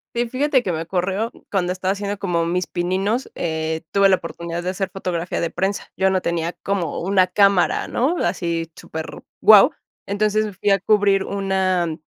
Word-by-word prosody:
Sí, 240 0 0
fíjate 265 0 +1
que 180 - -1
me 160 0 -2
ocurrió 190 +6 -1 0.2
cuando 180 -3 +1
estaba 185 +1 -1
haciendo 200 0 -4
como 175 -4 0
mis 180 +1 -1
pininos, 190 +8 -1
eh, 160 -1 -2
tuve 200 0 +5
la 190 - +5
oportunidad 170 0 -6
de 185 - 0
hacer 190 0 -3
fotografía 180 -2 -3
de 170 - -1
prensa. 190 +4 -2
Yo 190 0 +2
no 185 -1 +1
tenía 170 -1 -2
como 190 -6 -1
una 185 0 +2
cámara, 200 -3 +3
¿no? 290 +9 0
Así 165 -2 -2
super 160 0 -8 0.2
guau. 210 -2 +8 0.4
Entonces 210 0 0
fui 205 - +1
a 195 -1 +3
cubrir 200 -1 +3
una 190 -4 0
190 Hz, 175 wpm, -21 LUFS, 170-200 Hz, 0.4 s, guau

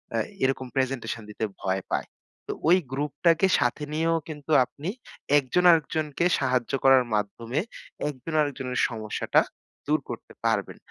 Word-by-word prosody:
আ - - +2 0.3
এরকম 130 0 0
প্রেজেন্টেশন 130 -4 -1
দিতে 105 - -5 0.2
ভয় 95 0 0
পায়। - - -1 0.4
তো - - -2 0.2
ওই 180 - +7
গ্রুপটাকে 155 +6 +2
সাথে 125 +5 0
নিয়েও 165 +1 +2
কিন্তু 150 -1 -7
আপনি 145 +7 -7 0.5
একজন 140 +6 0
আরেকজনকে 155 0 +1
সাহায্য 130 -3 0
করার 135 -2 +6
মাধ্যমে 115 +6 -2 0.5
একজন 145 +3 -7
আরেকজনের 135 -3 -2
সমস্যাটা 110 -2 +1 0.5
দূর 155 +1 +3
করতে 120 - -8
পারবেন। 110 -4 0
135 Hz, 130 wpm, -26 LUFS, 120-155 Hz, 0.5 s, ওই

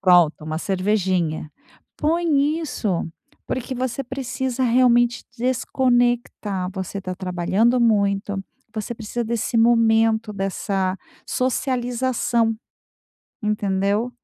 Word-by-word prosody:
pronto, 175 -4 +4
uma 155 0 -3
cervejinha. 185 -5 0 0.5
Põe 310 -1 +2
isso, 225 - -2 0.4
porque 255 +1 -3
você 255 +1 -2
precisa 260 0 -3
realmente 240 0 +3
desconectar. 240 -6 0
Você 190 +1 -4
tá 185 -1 -4
trabalhando 185 +6 +1
muito. 200 -3 +1 0.3
Você 215 +2 -4
precisa 230 +1 -4
desse 235 +1 -1
momento, 225 -1 +3
dessa 195 -1 -1 0.3
socialização. 245 -2 0 0.9
Entendeu? 205 +2 0
225 Hz, 90 wpm, -22 LUFS, 195-245 Hz, 0.9 s, pronto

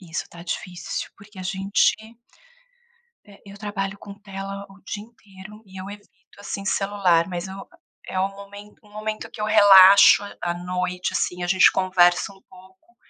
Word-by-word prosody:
Isso 170 -3 -5
tá 170 - -12
difícil. 175 0 -5
Porque 200 0 -16
a 185 - -6
gente 195 +2 +1 1.3
eh, 200 -1 -17
eu 200 0 -12
trabalho 200 -2 -4
com 200 - -11
tela 195 -1 -8
o 195 0 -18
dia 205 +1 -6
inteiro 210 -2 -15
e 190 0 -12
eu 190 +2 -8
evito, 205 0 -13 0.3
assim, 200 0 -6
celular. 195 -4 +1
Mas 175 0 -5
eu 190 +1 -9
a - - -13 0.4
é 185 - -3
um 195 +1 0
momen 205 +1 -12
um 210 - -22
momento 215 +1 -6
que - - -11
eu - - -1
relaxo 200 -2 +7 0.2
à 175 0 -1
noite, 180 +1 -3
assim, 180 0 -2
a - - -2
gente 185 +1 +5
conversa 185 0 +2
um 195 - -20
pouco 190 +5 -20
195 Hz, 175 wpm, -23 LUFS, 185-205 Hz, 1.3 s, relaxo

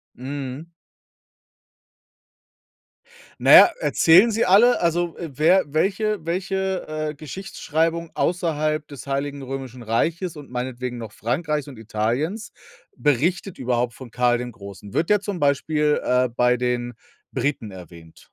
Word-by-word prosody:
Mhm. 135 +3 -6 2.7
Na - - +4
ja, - - +11
erzählen 190 - +5
sie 225 +2 +1
alle? 210 +6 +5
Also, 170 0 0
wer 165 +4 +2
welche 200 +8 0
welche, 190 +2 -2 0.2
äh, - - -5
Geschichtsschreibung 165 +1 -3
außerhalb 155 -3 -1
des 140 -3 -10
Heiligen 140 0 -3
Römischen 130 -2 -7
Reiches 165 - -1
und 145 -2 -11
meinetwegen 125 0 -4
noch 115 -3 -7
Frankreichs 150 +7 -2
und 135 - -10
Italiens 120 - -2 0.4
berichtet 170 +7 0
überhaupt 120 -1 0
von 130 +1 -11
Karl 120 0 +1
dem 125 0 -5
Großen? 100 -1 -11
Wird 165 +5 0
der 210 -1 +4
zum 200 -3 -4
Beispiel, 150 +1 +1
äh, 125 0 +2
bei 125 0 +3
den 120 0 -2 0.4
Briten 135 -7 -2
erwähnt? 85 -3 -13
145 Hz, 125 wpm, -23 LUFS, 125-170 Hz, 2.7 s, ja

